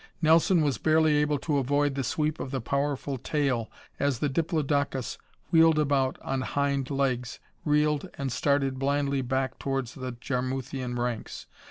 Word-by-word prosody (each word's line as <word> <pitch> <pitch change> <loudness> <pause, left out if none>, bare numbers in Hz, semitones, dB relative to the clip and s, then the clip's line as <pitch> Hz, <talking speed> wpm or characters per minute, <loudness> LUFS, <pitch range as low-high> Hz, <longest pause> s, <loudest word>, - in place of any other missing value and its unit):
Nelson 165 +2 +4
was 145 -4 0
barely 155 -1 +3
able 150 0 +2
to 145 0 0
avoid 145 +2 +1
the 135 0 -2
sweep 155 +4 -1
of - - -4
the 135 0 -2
powerful 140 +2 -2
tail 135 -5 0 0.3
as 140 -3 +1
the 145 - 0
diplodocus 145 -4 -1 0.3
wheeled 165 -1 +6
about 140 -3 +1
on 135 -1 -1
hind 140 -1 -1
legs, 130 -4 -1 0.3
reeled 150 -1 +2
and 135 -3 -2
started 135 -1 +1
blindly 140 0 +1
back 130 +1 -2
towards 135 -3 -2
the 130 -4 -5
Jarmuthian 130 0 -3
ranks. 120 -2 -3
140 Hz, 150 wpm, -27 LUFS, 130-150 Hz, 0.3 s, wheeled